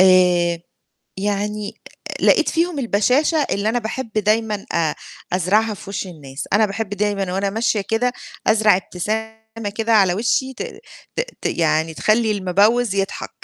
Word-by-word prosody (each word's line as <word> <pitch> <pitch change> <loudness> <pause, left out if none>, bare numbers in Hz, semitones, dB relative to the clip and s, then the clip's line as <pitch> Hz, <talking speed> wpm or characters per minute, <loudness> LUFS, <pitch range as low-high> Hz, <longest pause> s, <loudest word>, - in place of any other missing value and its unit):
آآ، 180 -2 +5 0.6
يعني 205 +1 -2 0.2
آآ، - - -7
لقيت - - +5
فيهم 335 -1 0
البَشاشة 270 +6 +2
اللي 200 +2 0
أنا 235 +2 +1
باحب 230 +1 -5
دايمًا 215 0 0
آآ 160 -3 +1 0.4
أزرعها 205 +5 +2
في 195 - -10
وِش 195 - -3
الناس. 145 -6 -8
أنا 215 +2 +5
باحب 205 +1 -4
دايمًا 205 -2 -1
وأنا 195 +1 0
ماشية 220 0 +1
كده 225 +5 0 0.3
أزرع 215 -3 +5
ابتسامة 215 +5 -3 0.4
كده 225 0 +1
على 195 -5 +5
وِشّي 235 +5 0
ت - - -5 0.5
ت - - +1 0.2
ت - - -3
يعني 160 -1 +1
تخلّي 220 +5 +2
المِبوِّز 205 +4 +2
يضحك. 195 -1 -2
210 Hz, 145 wpm, -20 LUFS, 190-225 Hz, 0.6 s, آآ